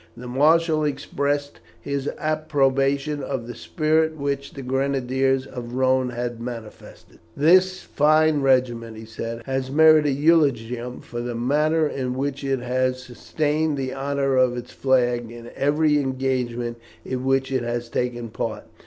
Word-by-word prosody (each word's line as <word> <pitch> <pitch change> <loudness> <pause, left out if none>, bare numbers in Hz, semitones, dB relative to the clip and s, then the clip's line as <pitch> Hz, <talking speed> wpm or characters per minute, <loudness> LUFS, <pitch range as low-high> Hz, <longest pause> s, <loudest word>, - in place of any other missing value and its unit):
The 125 - -9
marshal 155 +4 +3
expressed 145 0 -2 0.2
his 140 0 -3
approbation 145 -2 0
of 135 -4 -4
the 120 - -7
spirit 160 +1 0
which 140 -1 -3
the 135 - -7
Grenadiers 135 0 0
of 120 -2 -7
the 120 - -7
Rhone 130 0 +2
had 120 -1 -4
manifested. 115 -3 -9 0.2
"This 185 +5 +4
fine 155 0 +3
regiment," 120 -4 +1
he 110 - -9
said, 115 +1 -6
"has 135 -1 -2
ever 135 +3 -5
merited 155 -3 +6
eulogium 125 -6 +1
for 120 -1 -6
the 120 0 -4
manner 150 +6 +2
in 130 -3 -3
which 140 +1 -3
it 135 -2 -1
has 130 +1 -1
sustained 150 +4 -1
the 130 -1 -3
honour 135 0 0
of 125 -1 +3
its 120 0 -7
flag 120 -3 +1
in 120 0 -10
every 150 +1 +2
engagement 125 -3 -2 0.3
in 130 -1 -3
which 135 0 +1
it 130 -2 0
has 120 0 -3
taken 120 -1 -3
part. - - -4
135 Hz, 150 wpm, -23 LUFS, 125-145 Hz, 0.3 s, merited